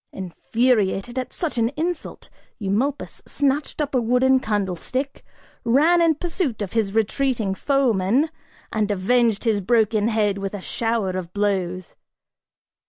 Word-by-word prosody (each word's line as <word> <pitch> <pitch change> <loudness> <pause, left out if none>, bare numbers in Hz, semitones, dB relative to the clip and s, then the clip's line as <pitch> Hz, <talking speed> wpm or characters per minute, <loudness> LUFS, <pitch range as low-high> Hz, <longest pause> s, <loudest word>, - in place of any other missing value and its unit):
Infuriated 220 +4 0
at 255 -1 -5
such 315 -9 -2
an 230 0 +2
insult, 335 +1 -3 0.3
Eumolpus 230 +8 -2
snatched 285 +2 0
up 295 -2 -1
a 255 - +3
wooden 250 +3 +3
candlestick, 215 - -2 0.4
ran 310 +9 +4
in 330 -2 +4
pursuit 310 - -2
of 190 - -6
his 215 -4 0
retreating 225 -2 +1
foeman, 260 +2 +1 0.4
and 215 -2 0
avenged 220 +2 +2
his 220 -4 +1
broken 220 0 +2
head 210 -3 +1
with 195 +1 -4
a - - -5
shower 225 -2 -1
of 185 -2 -5
blows. 185 -3 -1
225 Hz, 130 wpm, -23 LUFS, 200-265 Hz, 0.4 s, ran